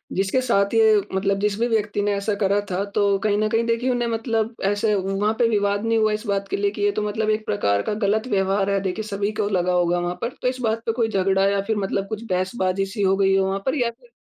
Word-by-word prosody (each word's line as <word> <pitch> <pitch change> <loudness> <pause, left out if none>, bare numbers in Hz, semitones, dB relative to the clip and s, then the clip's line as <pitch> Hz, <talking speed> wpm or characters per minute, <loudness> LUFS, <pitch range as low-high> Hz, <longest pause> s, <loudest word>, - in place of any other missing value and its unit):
जिसके 195 +7 +1
साथ 200 -4 +1
ये 220 -1 +5 0.2
मतलब 195 +1 +1
जिस 205 0 0
भी 235 - +2
व्यक्ति 210 -3 0
ने 205 0 +1
ऐसा 200 +1 -1
करा 200 +1 +2
था, 185 +2 0
तो 200 -1 +1
कहीं 205 0 +1
न 215 0 +1
कहीं 225 +1 +1
देखिए 230 +2 0
उन्हें 240 -1 0
मतलब 225 0 -1
ऐसे 205 +2 +1
वहाँ 195 +3 0
पे 235 - +4
विवाद 205 -1 0
नहीं 225 0 +2
हुआ 215 -1 +2
इस 215 +2 -4
बात 200 0 -1
के - - -2
लिए 200 0 0
कि 210 - -7
ये 205 0 +3
तो 210 - -2
मतलब 215 +1 -1
एक 215 0 0
प्रकार 100 - +1
का - - -2
गलत 215 +3 0
व्यवहार 195 0 +1
है, 200 0 +1
देखिए 195 +3 -3
सभी 205 0 -2
को 205 - +1
लगा 180 -2 +1
होगा 175 0 +2
वहाँ 175 0 -2
पर, 235 - -1
तो - - 0
इस 255 0 -2
बात 225 0 -1
पे 225 - +1
कोई 225 -1 0
झगड़ा 195 -1 +2
या 200 0 +1
फिर 220 -1 0
मतलब 195 0 -2
कुछ 220 +1 -5
बहसबाजी 185 +1 0
सी 200 +2 -5
हो 190 0 +3
गई 195 -1 +3
हो 190 0 +2
वहाँ 195 +1 -1
पर? 265 +3 0
या 240 -4 +1
फिर 475 - -24
205 Hz, 270 wpm, -22 LUFS, 195-220 Hz, 0.2 s, ये